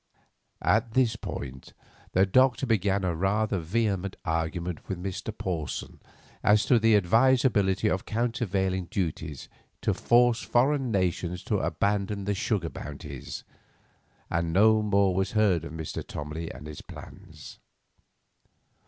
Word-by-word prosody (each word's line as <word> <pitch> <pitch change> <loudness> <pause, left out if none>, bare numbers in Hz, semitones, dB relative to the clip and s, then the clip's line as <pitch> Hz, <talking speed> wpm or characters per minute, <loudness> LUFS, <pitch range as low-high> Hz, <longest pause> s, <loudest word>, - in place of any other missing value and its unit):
At 115 0 +2
this 125 -4 +3
point 65 -10 -7 0.4
the 95 +1 +5
Doctor 130 +5 +3
began 100 -4 +1
a 90 -2 0
rather 95 +4 0
vehement 100 +1 -1
argument 80 +1 -3
with 95 - -2
Mr. 95 +4 -4
Porson 85 -6 -4 0.4
as 105 +1 +4
to 120 - +4
the 115 0 +4
advisability 110 -1 +3
of 95 -3 0
countervailing 100 -5 -1
duties 80 -5 -4 0.4
to - - +2
force 120 0 +3
foreign 135 +1 +2
nations 90 -3 -1
to - - 0
abandon 100 0 -1
the 100 - 0
sugar 95 -3 -1
bounties, 70 -2 -8 0.8
and 85 -1 -1
no 110 +4 +5
more 100 -2 +2
was 95 +1 -1
heard 105 -7 +3
of - - -7
Mr. 80 -1 -5
Tomley 75 +2 -6
and 75 - -10
his 75 -1 -8
plans. - - -12
95 Hz, 125 wpm, -27 LUFS, 85-110 Hz, 0.8 s, the